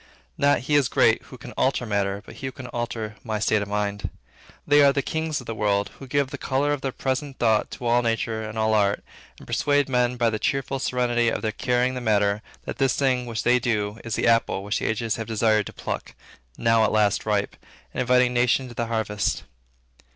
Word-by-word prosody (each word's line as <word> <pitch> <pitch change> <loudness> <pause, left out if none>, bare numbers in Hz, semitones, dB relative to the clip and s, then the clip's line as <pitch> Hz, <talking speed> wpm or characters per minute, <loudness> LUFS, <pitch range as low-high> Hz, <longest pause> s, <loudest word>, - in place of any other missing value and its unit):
Not 140 -3 +3
he 145 +4 -2
is 145 -3 +4
great - - +3
who - - -12
can - - -10
alter 130 -2 0
matter, 100 -1 -1
but - - -12
he 135 - -5
who - - -4
can 130 - -10
alter 115 -3 -4
my 110 -2 -2
state 105 0 +2
of 100 - -4
mind. 105 0 -2 0.6
They 145 0 +5
are 140 -1 +7
the 140 0 -1
kings 160 0 -2
of 125 - -10
the 115 - -4
world 100 -2 0
who 135 - -9
give 140 0 0
the - - -6
color 140 +2 0
of 145 - -3
their 135 - -2
present 135 +2 -3
thought 110 -2 +2
to 125 - -8
all 120 +1 +3
nature 115 -1 -1
and 110 0 -6
all 110 0 +2
art, 100 -1 +2 0.3
and - - -13
persuade 145 -1 +1
men 125 -1 +1
by 120 -1 +2
the 110 - -2
cheerful 135 +2 -1
serenity 120 -2 +1
of - - -3
their 110 - 0
carrying 125 +3 0
the 125 - -4
matter, 105 -2 +2 0.2
that - - -6
this 135 -2 +2
thing 130 -3 +1
which 115 -2 -3
they 125 +1 +4
do, 110 -2 -1
is 115 -2 -3
the - - 0
apple 115 -4 +2
which 100 +1 -1
the - - -3
ages 110 0 -1
have 115 - -5
desired 110 -2 +2
to - - -9
pluck, - - -5 0.4
now 115 -1 +3
at 110 - +2
last 105 0 +2
ripe, 105 -1 0 0.4
and - - -1
inviting 125 0 +3
nations 125 +1 +2
to - - -9
the 120 0 -2
harvest. 105 -4 -1
115 Hz, 225 wpm, -24 LUFS, 110-130 Hz, 0.6 s, are